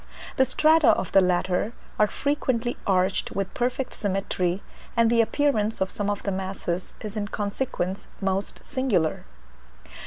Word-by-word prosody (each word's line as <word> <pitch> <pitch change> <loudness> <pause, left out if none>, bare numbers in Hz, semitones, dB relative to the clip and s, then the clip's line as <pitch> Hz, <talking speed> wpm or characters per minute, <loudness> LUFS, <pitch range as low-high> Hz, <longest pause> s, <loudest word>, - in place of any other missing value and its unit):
The 265 - +5
strata 315 +2 +4
of 185 - +3
the 195 - +6
latter 180 +4 +1 0.3
are 210 - +6
frequently 250 -3 -1
arched 185 0 +1
with 195 -1 -2
perfect 250 +1 -1
symmetry, 190 -2 -1 0.3
and 230 0 +5
the 235 -1 +5
appearance 225 -3 +1
of 190 0 0
some 205 -1 -1
of 205 -1 -2
the 200 - -1
masses 185 -2 -3
is 215 -1 -6
in 205 -1 -2
consequence 200 -2 -3
most 195 0 -2
singular. 235 - 0
205 Hz, 145 wpm, -25 LUFS, 190-240 Hz, 0.3 s, the